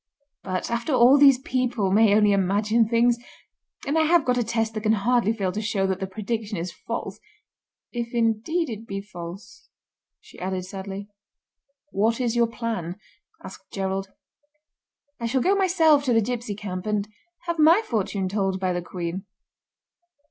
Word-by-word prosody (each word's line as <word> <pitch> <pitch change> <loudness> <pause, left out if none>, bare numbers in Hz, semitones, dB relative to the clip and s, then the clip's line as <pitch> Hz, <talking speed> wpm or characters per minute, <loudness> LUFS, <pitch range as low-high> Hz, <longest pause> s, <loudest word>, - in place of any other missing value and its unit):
But, 185 +3 -3
after 235 +5 -1
all 255 +3 +6
these 275 -2 +7
people 250 -6 -1
may 210 0 +5
only 210 -1 +4
imagine 205 +4 +2
things, 235 0 +3 0.7
and 300 +3 +1
I 315 - +3
have 335 -1 +4
got 250 -1 +2
a - - +2
test 225 0 -1
that 215 - -4
can 215 0 +2
hardly 225 +1 +2
fail 200 -5 -1
to 210 +4 -3
show 210 -3 0
that 190 -1 -1
the 190 - -3
prediction 215 +1 -4
is 170 +2 -4
false—if 235 +6 -8
indeed 235 +8 0
it 225 +1 -7
be 195 0 -4
false," 195 - -10 0.5
she - - -16
added 185 0 -3
sadly. 195 +1 -7 0.8
"What 225 +4 +1
is 240 -2 0
your 235 -1 +3
plan?" 225 -7 -4 0.5
asked - - -11
Gerald. 195 0 -3 1.1
"I 235 - -2
shall 260 +3 +1
go 380 - +3
myself 340 -7 +4
to 250 - +2
the 225 - +5
gipsy 235 -1 -3
camp, 190 -2 -6
and 210 -1 0 0.3
have 340 -1 -3
my 330 +8 +6
fortune 200 -3 -1
told 195 -1 -1
by 185 -1 0
the 175 - -2
Queen." 175 +1 -5
220 Hz, 165 wpm, -24 LUFS, 195-245 Hz, 1.1 s, these